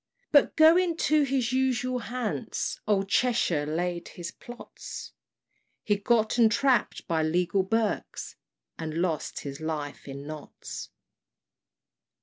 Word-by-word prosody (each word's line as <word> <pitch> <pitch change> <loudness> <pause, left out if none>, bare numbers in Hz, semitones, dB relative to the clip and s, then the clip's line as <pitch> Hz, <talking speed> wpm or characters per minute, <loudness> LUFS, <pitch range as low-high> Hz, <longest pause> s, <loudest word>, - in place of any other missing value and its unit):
But 290 - +5
going 330 +2 +5
to 310 -2 +3
his 260 -3 0
usual 255 -1 +1
Hants, 240 -2 -3
Old 195 -2 +2
Cheshire 195 -10 +2
laid 175 +2 -2
his 175 0 -7
plots: 240 0 -9 0.7
He 205 - +2
got 220 +3 +1
entrapp'd 240 +1 +3
by 165 -2 +1
legal 175 +4 +2
Berks, 220 +2 -2 0.4
And 160 -1 -4
lost 165 -3 -1
his 140 -1 -6
life 150 -3 -4
in 140 +1 -7
Notts. 155 0 -8
210 Hz, 115 wpm, -28 LUFS, 160-250 Hz, 0.7 s, But